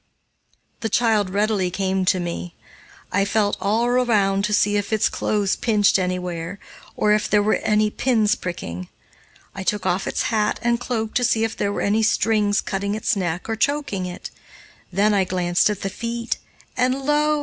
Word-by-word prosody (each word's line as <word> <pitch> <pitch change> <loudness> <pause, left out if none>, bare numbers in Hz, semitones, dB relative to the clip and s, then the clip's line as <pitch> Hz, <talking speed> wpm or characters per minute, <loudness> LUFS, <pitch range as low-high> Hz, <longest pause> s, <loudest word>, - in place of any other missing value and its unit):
The 225 - -2
child 215 -3 +2
readily 200 -1 +1
came 190 0 -1
to 185 0 +2
me. 175 0 -5 0.6
I 200 - +2
felt 205 0 +1
all 220 +4 +1
around 215 -6 +2
to 210 - -2
see 205 0 +3
if 205 +1 -1
its 220 -1 +3
clothes 205 -2 0
pinched 210 -4 +2
anywhere, 180 -1 -3 0.4
or 210 0 +3
if 210 - 0
there 210 -1 +3
were 215 - +2
any 210 0 +1
pins 220 -5 +2
pricking. 90 - -5 0.6
I 195 - -6
took 200 +1 -1
off 185 +1 0
its - - -1
hat 210 -1 +1
and 235 0 +2
cloak 225 -3 -3
to 245 - +1
see 225 -2 +2
if 225 -1 -1
there 200 - -1
were - - -3
any 210 +2 +2
strings 210 -1 +2
cutting 200 +1 -2
its 220 - 0
neck 175 -3 -3
or 225 - -1
choking 225 -7 -1
it. 180 - -8 0.6
Then 205 +3 +2
I 195 -2 +3
glanced 180 0 +1
at 210 - -3
the 195 - -2
feet, 235 +1 -3 0.4
and 255 +2 0
lo! 300 +1 +2
210 Hz, 180 wpm, -22 LUFS, 190-225 Hz, 0.6 s, see